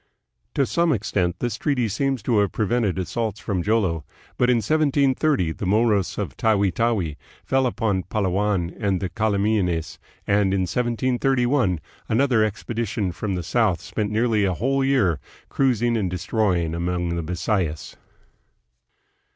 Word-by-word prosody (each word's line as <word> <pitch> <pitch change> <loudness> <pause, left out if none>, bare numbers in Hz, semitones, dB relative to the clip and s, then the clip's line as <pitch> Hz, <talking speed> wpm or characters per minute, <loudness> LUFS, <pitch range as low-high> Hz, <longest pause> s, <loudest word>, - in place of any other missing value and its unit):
To 140 - +3
some 170 +4 +1
extent 95 - 0
this 120 0 -2
treaty 130 -5 0
seems 130 +2 -1
to 115 -2 +2
have 100 -1 +1
prevented 110 -3 0
assaults 110 +3 -2
from 95 -4 -2
Jolo, 95 -6 +1 0.3
but 125 - +2
in 125 - +5
1730 140 - +2
the 95 - -5
Moros 105 -1 +2
of - - -3
Tawi 100 -4 +2
Tawi 95 -7 0 0.3
fell 135 -1 +2
upon 110 -6 0
Palawan 95 -2 0
and 100 -4 0
the 95 - -3
Calamianes, 100 -5 0 0.3
and 100 -1 +2
in 95 - +1
1731 125 - +1 0.3
another 120 -1 +3
expedition 110 -2 -2
from 100 +2 -3
the 90 - -3
south 105 -1 +1
spent 105 +1 -3
nearly 110 -1 +1
a 95 -2 +1
whole 135 +7 0
year 105 - +2 0.3
cruising 120 -3 +1
and 100 -5 0
destroying 90 -3 0
among 85 +1 -1
the 85 0 -1
Bisayas. 90 -1 -2
105 Hz, 140 wpm, -23 LUFS, 95-120 Hz, 0.3 s, in